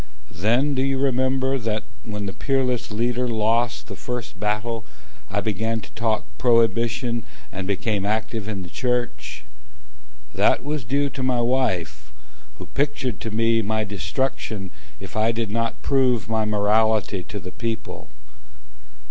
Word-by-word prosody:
Then 120 Hz, +10 st, +2 dB
do 130 Hz, -, +1 dB
you 135 Hz, 0 st, +1 dB
remember 130 Hz, 0 st, +2 dB
that, 110 Hz, -2 st, -1 dB, 0.2 s
when 105 Hz, -2 st, -4 dB
the 95 Hz, -, -3 dB
Peerless 130 Hz, -3 st, 0 dB
Leader 120 Hz, +3 st, 0 dB
Lost 115 Hz, 0 st, +1 dB
the -, -, -7 dB
first 125 Hz, -6 st, -5 dB
battle, 105 Hz, +2 st, -1 dB, 0.5 s
I 100 Hz, 0 st, 0 dB
began 110 Hz, +2 st, 0 dB
to -, -, -12 dB
talk 110 Hz, -2 st, 0 dB
prohibition, 115 Hz, 0 st, +3 dB, 0.3 s
And 95 Hz, -1 st, -4 dB
became 100 Hz, 0 st, 0 dB
active 110 Hz, 0 st, -1 dB
in 100 Hz, -3 st, -3 dB
the 90 Hz, -, -9 dB
church? 125 Hz, -1 st, -1 dB, 0.9 s
That -, -, +3 dB
was 145 Hz, -3 st, -2 dB
due 140 Hz, +4 st, +1 dB
to 135 Hz, -, -5 dB
my 130 Hz, -2 st, +2 dB
wife, 120 Hz, -, 0 dB, 0.5 s
Who -, -, -7 dB
pictured 135 Hz, -5 st, -1 dB
to 115 Hz, -, -3 dB
me 115 Hz, +1 st, +3 dB
my 110 Hz, +1 st, 0 dB
destruction 100 Hz, -, -2 dB, 0.3 s
If -, -, -9 dB
I 110 Hz, +1 st, +3 dB
did 115 Hz, -2 st, -2 dB
not 115 Hz, +1 st, -1 dB
prove 125 Hz, -8 st, +3 dB
my 110 Hz, -1 st, +1 dB
morality 105 Hz, -1 st, +3 dB
to 105 Hz, -, -6 dB
the 90 Hz, 0 st, -7 dB
people. 115 Hz, -2 st, -4 dB
115 Hz, 145 wpm, -24 LUFS, 105-125 Hz, 0.9 s, prohibition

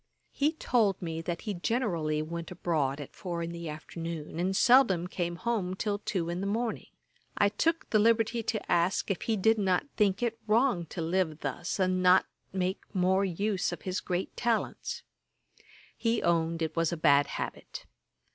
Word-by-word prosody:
He 295 Hz, +3 st, +1 dB
told 225 Hz, -, +1 dB
me, 165 Hz, -2 st, -4 dB
that 170 Hz, 0 st, -4 dB
he 210 Hz, -, -3 dB
generally 175 Hz, -7 st, 0 dB
went 165 Hz, +1 st, -5 dB
abroad 155 Hz, -6 st, -1 dB
at 145 Hz, -, -8 dB
four 170 Hz, -2 st, -4 dB
in 165 Hz, -, -4 dB
the 170 Hz, -1 st, -6 dB
afternoon, 160 Hz, +1 st, -6 dB
and 185 Hz, +2 st, 0 dB
seldom 240 Hz, -8 st, +5 dB
came 175 Hz, -1 st, -3 dB
home 190 Hz, -2 st, -1 dB
till 205 Hz, +1 st, -1 dB
two 185 Hz, -5 st, -2 dB
in 175 Hz, +2 st, -3 dB
the 200 Hz, -, -2 dB
morning. 225 Hz, +2 st, -2 dB, 0.5 s
I 205 Hz, -, +4 dB
took 330 Hz, +9 st, 0 dB
the 215 Hz, -, +4 dB
liberty 230 Hz, +1 st, +3 dB
to 220 Hz, -1 st, -3 dB
ask 175 Hz, +3 st, +2 dB
if 190 Hz, -, -2 dB
he 225 Hz, -2 st, 0 dB
did 220 Hz, +3 st, +3 dB
not 185 Hz, -3 st, +2 dB
think 205 Hz, 0 st, +2 dB
it 230 Hz, -1 st, -1 dB
wrong 215 Hz, -6 st, +2 dB
to 165 Hz, -, -4 dB
live 165 Hz, -2 st, 0 dB
thus, 160 Hz, +8 st, -3 dB
and 185 Hz, -1 st, +2 dB
not 180 Hz, +1 st, +6 dB, 0.3 s
make 185 Hz, 0 st, -1 dB
more 190 Hz, +1 st, +3 dB
use 195 Hz, +1 st, 0 dB
of 175 Hz, -, -7 dB
his 185 Hz, 0 st, -2 dB
great 180 Hz, 0 st, -3 dB
talents. 235 Hz, -2 st, -1 dB, 0.9 s
He 230 Hz, -1 st, 0 dB
owned 165 Hz, -1 st, +1 dB
it 160 Hz, -1 st, -3 dB
was 165 Hz, -1 st, +1 dB
a 170 Hz, -, -2 dB
bad 145 Hz, -2 st, +4 dB
habit. -, -, -6 dB
185 Hz, 175 wpm, -29 LUFS, 170-215 Hz, 0.9 s, not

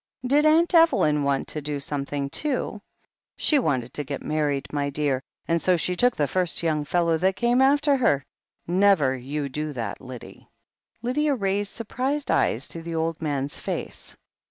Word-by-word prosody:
'Did 290 Hz, +4 st, +4 dB
Aunt 330 Hz, +3 st, +4 dB
Evelyn 325 Hz, -, +4 dB
want 140 Hz, -1 st, 0 dB
to 150 Hz, -, -3 dB
do 145 Hz, 0 st, -3 dB
something, 140 Hz, 0 st, -2 dB
too 260 Hz, -8 st, -1 dB, 0.3 s
?" -, -, -69 dB
'She 300 Hz, -, +3 dB
wanted 130 Hz, -, -1 dB
to 150 Hz, -, -1 dB
get 140 Hz, -1 st, -6 dB
married, 145 Hz, -3 st, -1 dB
my 145 Hz, -1 st, 0 dB
dear, 140 Hz, -2 st, 0 dB, 0.3 s
and 170 Hz, 0 st, +1 dB
so 185 Hz, -1 st, +3 dB
she 180 Hz, +2 st, 0 dB
took 245 Hz, +6 st, +2 dB
the 145 Hz, -, +1 dB
first 180 Hz, 0 st, 0 dB
young 155 Hz, -2 st, +1 dB
fellow 170 Hz, 0 st, +1 dB
that 190 Hz, +2 st, +2 dB
came 240 Hz, +3 st, +2 dB
after 285 Hz, +1 st, +4 dB
her. 145 Hz, -, +2 dB, 0.4 s
Never 175 Hz, -7 st, +3 dB
you 140 Hz, +3 st, -4 dB
do 150 Hz, +2 st, -4 dB
that, 115 Hz, -6 st, -5 dB
Lyddie." 125 Hz, -2 st, -11 dB, 0.5 s
Lydia 285 Hz, +4 st, +1 dB
raised 200 Hz, -2 st, -1 dB
surprised 260 Hz, +6 st, -2 dB
eyes 120 Hz, +5 st, +1 dB
to 165 Hz, -, -6 dB
the 165 Hz, 0 st, -5 dB
old 165 Hz, 0 st, -2 dB
man's 145 Hz, -2 st, -2 dB
face. -, -, -5 dB
165 Hz, 175 wpm, -25 LUFS, 140-235 Hz, 0.5 s, Did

